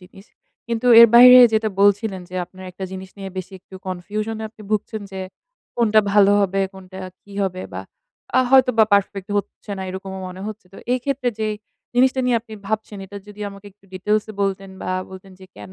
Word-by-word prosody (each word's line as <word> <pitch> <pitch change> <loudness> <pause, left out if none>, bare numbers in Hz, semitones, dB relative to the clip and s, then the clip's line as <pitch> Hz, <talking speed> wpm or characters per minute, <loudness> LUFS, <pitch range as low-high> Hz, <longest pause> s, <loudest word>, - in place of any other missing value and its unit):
জিনিস। 190 +2 -16 0.4
কিন্তু 235 +1 -2
এর 235 - +11
বাহিরে 250 +1 +10
যেটা 220 0 +1
বলছিলেন 200 -1 +2
যে - - -10
আপনার 185 +1 -14
একটা 190 +1 -7
জিনিস 190 0 -8
নিয়ে 195 -1 -6
বেশি 185 +1 -7
একটু 190 - -17
কনফিউশনে 215 +4 -4
আপনি 215 0 -16
ভুগছেন 215 +1 -2
যে, 190 - -5 0.6
কোনটা 220 -2 +4
ভালো 205 -1 +5
হবে? 195 0 0
কোনটা 190 0 -11 0.2
কী 200 - -16
হবে? 185 -1 -3
বা, - - -5 0.6
আ - - +6
হয়তোবা 255 -4 +5
পারফেক্ট 200 -1 +1
হচ্ছে 205 +1 -5
না, - - -4
এরকমও 190 0 -7
মনে 185 +1 -10
হচ্ছে। 215 -3 -8
তো - - -13 0.2
এইক্ষেত্রে 255 0 -1
যে 215 - -1 0.5
জিনিসটা 260 +1 +3
নিয়ে 250 -1 +2
আপনি 220 -1 -12
ভাবছেন, 215 -1 -3
এটা 200 +2 -10
যদি 210 0 -12
আমাকে 200 +1 -13
একটু 200 0 -33
ডিটেইলসে 210 +3 -1
বলতেন 195 0 -2
বা, 185 - -3 0.2
বলতেন 190 0 -12
যে - - -12
কেন 185 - -11
205 Hz, 185 wpm, -21 LUFS, 190-220 Hz, 0.6 s, এর